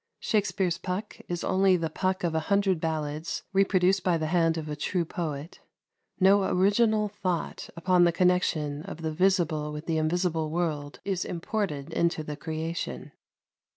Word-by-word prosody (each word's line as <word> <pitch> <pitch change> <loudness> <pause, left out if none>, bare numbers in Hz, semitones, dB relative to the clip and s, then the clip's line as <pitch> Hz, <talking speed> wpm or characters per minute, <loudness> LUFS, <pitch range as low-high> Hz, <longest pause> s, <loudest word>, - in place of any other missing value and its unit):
Shakspere's 195 -4 0
Puck 190 +3 -4
is 175 -1 -3
only 190 0 +3
the 165 -2 -2
Puck 185 +3 -1
of 170 -2 0
a 160 - +2
hundred 200 -4 +2
ballads 155 0 -3
reproduced 190 -1 +3
by 180 -3 +2
the 160 - -2
hand 165 0 +2
of 155 -1 -4
a 150 - -3
true 170 +3 -1
poet; 160 -3 -5 0.6
no 195 +1 +5
original 210 +3 +3
thought 185 -4 -3
upon 180 +1 +4
the 170 - +4
connection 170 -5 +1
of 165 - -8
the 160 - -1
visible 165 -4 +1
with 150 +1 -6
the 160 -1 0
invisible 160 0 0
world 155 -3 -2
is 190 -2 -1
imported 170 -5 -3
into 170 -2 +1
the 150 -1 -5
creation. 160 - -4
170 Hz, 155 wpm, -28 LUFS, 155-190 Hz, 0.6 s, no